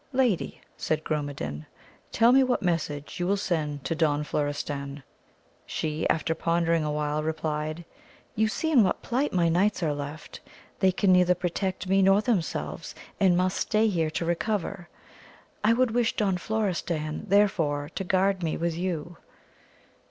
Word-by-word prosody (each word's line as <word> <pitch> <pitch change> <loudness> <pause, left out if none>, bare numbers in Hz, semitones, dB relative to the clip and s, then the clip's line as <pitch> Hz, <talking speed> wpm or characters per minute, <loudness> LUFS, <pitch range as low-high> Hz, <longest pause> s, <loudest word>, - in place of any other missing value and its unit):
Lady, 250 -8 +1 0.2
said 155 0 -1
GrmnedaUy 140 - -4 0.4
tell 230 +1 +5
me 270 +1 +6
what 255 -4 +1
message 160 -2 -2
you 175 - 0
will 200 +1 +2
send 155 -8 -2
to - - 0
Don 150 -2 +1
Florestan. 145 -1 -3 0.6
She, 155 +1 -2
after 160 +1 +1
pondering 165 0 +1
awhile 150 0 -1
replied, 155 +1 -3 0.5
you 220 +1 +2
see 315 +10 -2
in 255 -8 +6
what 185 - -1
plight 265 +5 0
my 175 -2 +2
knights 185 +3 +2
are 155 -2 +1
left, 145 +2 -7 0.4
they 190 -1 +4
can 190 +1 +2
neither 180 0 +4
protect 185 +2 -3
me 195 +1 +3
nor 195 +1 +5
themselves, 215 -6 -2 0.2
and 185 -3 +4
must 185 +1 +1
stay 220 +1 +2
here 165 -5 0
to 165 +2 -3
recover. 180 0 -2 0.7
I 220 +2 +5
would 250 0 +2
wish 235 0 +1
Don 195 -4 +1
Florestan 175 -6 -2
therefore 165 -7 +2
to - - -3
guard 190 +1 +1
me 160 -2 -1
with 170 -1 -1
you. 170 -1 -3
175 Hz, 150 wpm, -27 LUFS, 155-200 Hz, 0.7 s, me